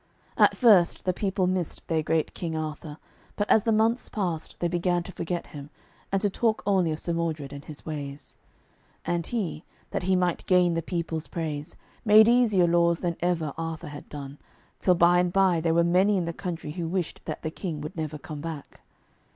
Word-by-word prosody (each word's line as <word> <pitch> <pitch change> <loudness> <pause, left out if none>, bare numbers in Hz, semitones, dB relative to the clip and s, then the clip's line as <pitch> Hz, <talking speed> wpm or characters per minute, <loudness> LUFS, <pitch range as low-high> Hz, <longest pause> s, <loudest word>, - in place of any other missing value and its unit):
At - - +4
first 205 -8 +5
the 185 - +2
people 190 0 0
missed 180 -2 -2
their 160 -1 +1
great 155 0 0
King 165 -2 -4
Arthur, 155 -1 -5 0.4
but 205 - -1
as 220 - +6
the 225 - +3
months 225 +3 +2
passed 175 -7 -3
they 175 - 0
began 175 0 0
to 190 - -8
forget 175 0 -3
him, 145 -1 -8 0.4
and 195 - +2
to 205 - +3
talk 225 +2 0
only 185 -5 +2
of 155 - -3
Sir 170 - -2
Modred 160 -4 -2
and 140 0 -8
his 150 -2 -9
ways. 145 -2 -6 0.7
And 170 -1 -1
he, 190 -10 -3 0.3
that - - -1
he 185 +2 +2
might 180 -2 0
gain 180 -2 +4
the 165 - 0
people's 165 -2 -3
praise, 155 -1 -4 0.3
made 215 -1 +7
easier 230 -7 +4
laws 170 0 +3
than 175 -2 -1
ever 165 -4 0
Arthur 165 -2 -4
had 145 0 -10
done, 140 -1 -8 0.4
till 180 - +3
by 175 +1 +5
and 180 0 +1
by 185 -3 +3
there 165 0 +1
were 170 - +5
many 185 +4 +3
in 175 - 0
the 170 - -3
country 165 -4 -5
who 170 +1 -4
wished 175 -1 -3
that - - -5
the 160 - -2
King 165 -3 -5
would 150 - -7
never 155 -2 -4
come 150 +1 -8
back. 160 -3 -7
170 Hz, 200 wpm, -26 LUFS, 155-185 Hz, 0.7 s, made